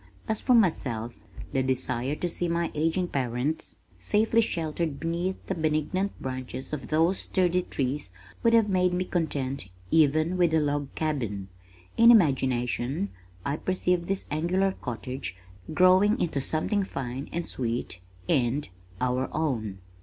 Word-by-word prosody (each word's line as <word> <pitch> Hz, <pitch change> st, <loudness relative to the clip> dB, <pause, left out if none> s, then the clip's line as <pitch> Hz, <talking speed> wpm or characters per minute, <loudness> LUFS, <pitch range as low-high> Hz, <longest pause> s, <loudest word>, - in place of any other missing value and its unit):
As 220 Hz, -, 0 dB
for 250 Hz, -, +4 dB
myself, 125 Hz, -, +1 dB, 0.4 s
the 135 Hz, -, +2 dB
desire 130 Hz, +1 st, -1 dB
to 175 Hz, -, -2 dB
see 175 Hz, +1 st, -2 dB
my 170 Hz, 0 st, 0 dB
aging 165 Hz, +4 st, +1 dB
parents 130 Hz, +3 st, -2 dB, 0.2 s
safely 220 Hz, -, +3 dB
sheltered 160 Hz, -6 st, -2 dB
beneath 170 Hz, +3 st, -1 dB
the -, -, -1 dB
benignant 160 Hz, +4 st, -1 dB
branches 130 Hz, +1 st, -5 dB
of 135 Hz, -6 st, -4 dB
those 165 Hz, +5 st, +2 dB
sturdy 180 Hz, -1 st, +1 dB
trees 135 Hz, -, -3 dB, 0.3 s
would 230 Hz, -1 st, +4 dB
have 225 Hz, -2 st, +5 dB
made 180 Hz, -2 st, +2 dB
me 185 Hz, +1 st, 0 dB
content 140 Hz, -, -2 dB, 0.2 s
even 155 Hz, +3 st, +3 dB
with 170 Hz, -3 st, +3 dB
a -, -, +5 dB
log 145 Hz, -2 st, 0 dB
cabin. 115 Hz, -11 st, -2 dB, 0.5 s
In 230 Hz, +1 st, +8 dB
imagination 135 Hz, -, +3 dB, 0.4 s
I 140 Hz, +2 st, 0 dB
perceived 180 Hz, -2 st, 0 dB
this 195 Hz, 0 st, -1 dB
angular 180 Hz, +6 st, +1 dB
cottage 125 Hz, -, -5 dB, 0.3 s
growing 185 Hz, +7 st, +5 dB
into 145 Hz, -5 st, 0 dB
something 160 Hz, +9 st, 0 dB
fine 135 Hz, -5 st, -5 dB
and 170 Hz, 0 st, -2 dB
sweet 115 Hz, -7 st, -3 dB, 0.3 s
and 130 Hz, +3 st, +1 dB, 0.3 s
our 125 Hz, +1 st, 0 dB
own! 110 Hz, -11 st, -2 dB
155 Hz, 140 wpm, -27 LUFS, 130-180 Hz, 0.5 s, In